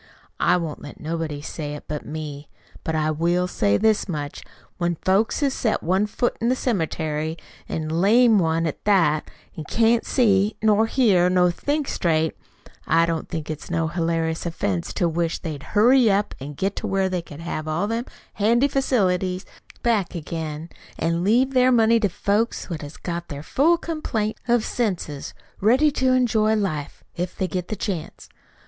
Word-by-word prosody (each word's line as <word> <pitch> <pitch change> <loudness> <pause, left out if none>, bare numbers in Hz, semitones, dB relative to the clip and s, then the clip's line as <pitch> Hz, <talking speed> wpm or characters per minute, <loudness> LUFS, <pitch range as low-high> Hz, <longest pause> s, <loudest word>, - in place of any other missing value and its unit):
I - - +4
won't 165 -4 -4
let 145 - -10
nobody 160 -2 -4
say 150 -2 -5
it 150 - -9
but 150 -1 -4
me. 150 -2 -7 0.3
But 160 - -2
I 155 0 +1
will 170 +3 +1
say 100 - +1
this 220 -2 +2
much. 145 -4 -4 0.4
When 175 -1 0
folks 195 - +1
has 275 -2 +2
set 225 -5 -1
one 190 +5 +2
foot 240 +3 -1
in 230 - +2
the 255 - +3
cemetery, 160 - -2 0.3
an' 155 -1 -3
a - - -2
lame 215 +5 +5
one 165 -1 +1
at 155 - -4
that, 165 -7 +3 0.3
an' 155 - -6
can't 230 +5 +2
see 205 -4 +2
nor 220 0 +3
hear 200 -8 +3
nor 180 -1 +3
think 285 - -2
straight, 160 -2 0 0.5
I 165 0 +4
don't 165 -1 -3
think 160 -3 -4
it's 155 -1 -6
no 165 -2 0
hilarious 165 -1 -1
offense 100 - -2
to 175 - +1
wish 170 0 -1
they'd 155 -4 -6 0.2
hurry 245 +2 +6
up 200 +1 +1
an' 140 +2 -7
get 195 +6 -1
to 220 - -3
where 195 -1 +1
they 185 -2 -2
could 155 -2 -11
have 155 -2 -4
all 155 +5 0
them 230 +3 -2 0.3
handy 235 +6 +3
facilities 190 -9 0 0.4
back 220 -7 +1
again, 160 -1 -5 0.3
an' 170 +1 0
leave 245 +7 +3
their 255 0 +5
money 230 -1 +4
to 205 -3 +1
folks 205 +3 -1
what 165 -1 -4
has 145 +1 -9
got 170 -1 -5
their 145 0 -7
full 315 - +3
complaint 250 -11 -3
of 240 -2 +2
senses, 180 - -3 0.2
ready 260 +9 +4
to 260 -2 +1
enjoy 220 -4 +3
life, 170 -9 -3
if 175 +1 -4
they 190 - 0
get 180 +1 -4
a - - 0
chance. 185 -5 -5
180 Hz, 180 wpm, -23 LUFS, 160-220 Hz, 0.5 s, hurry